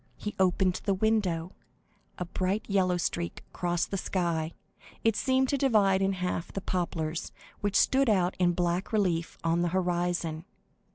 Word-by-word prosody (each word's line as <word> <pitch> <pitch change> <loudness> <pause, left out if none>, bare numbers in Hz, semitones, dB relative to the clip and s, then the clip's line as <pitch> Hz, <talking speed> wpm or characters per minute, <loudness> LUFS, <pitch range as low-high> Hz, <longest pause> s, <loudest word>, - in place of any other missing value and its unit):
He 210 - -5
opened 185 0 +2
the 195 - +2
window; 185 -5 +1 0.7
a 180 - -3
bright 185 +4 -1
yellow 185 -3 +2
streak 170 0 -2
crossed 175 -1 -1
the 195 - -1
sky, 170 -4 -1 0.5
and 225 -2 +4
seemed 260 +3 +2
to 280 - +1
divide 205 -8 +3
in 195 0 +2
half 180 -2 -3
the - - -3
poplars, 165 -3 -2 0.3
which 205 -1 -1
stood 270 -1 +4
out 185 -3 +2
in 175 -1 +3
black 175 +1 -1
relief 180 -6 0
on 165 +1 +2
the 175 - +2
horizon. 175 -2 -1
180 Hz, 155 wpm, -29 LUFS, 175-200 Hz, 0.7 s, and